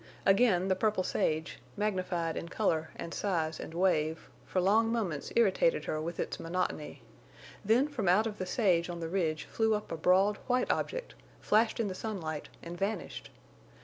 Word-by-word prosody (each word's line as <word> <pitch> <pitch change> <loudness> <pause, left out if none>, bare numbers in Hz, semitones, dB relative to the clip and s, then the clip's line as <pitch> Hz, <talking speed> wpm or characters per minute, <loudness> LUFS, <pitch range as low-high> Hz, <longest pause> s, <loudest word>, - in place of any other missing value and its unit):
Again 195 -2 +4
the 190 - +2
purple 210 -1 +1
sage, 160 -2 -1 0.2
magnified 185 -5 -1
in 170 - -5
color 160 -7 0
and 170 - -6
size 165 -5 -1
and - - -7
wave, 160 -3 +1 0.2
for 185 - 0
long 220 +5 +3
moments 190 -11 -2
irritated 235 - +3
her 155 - -2
with 170 +2 -5
its - - -3
monotony. 165 -3 -3 0.6
Then 230 +7 +3
from 255 -10 -3
out 195 +5 +5
of 215 -2 -4
the 185 - -3
sage 180 -5 +2
on 170 -1 -5
the 165 -1 -4
ridge 165 -4 0
flew 220 -1 +1
up 210 - -5
a 165 - -3
broad, 190 +5 +3
white 250 0 +2
object, - - -3 0.3
flashed 220 +2 +2
in 225 - +1
the 190 - -3
sunlight 175 -7 -5
and 170 +1 -6
vanished. 200 +3 -3
190 Hz, 175 wpm, -31 LUFS, 170-215 Hz, 0.6 s, out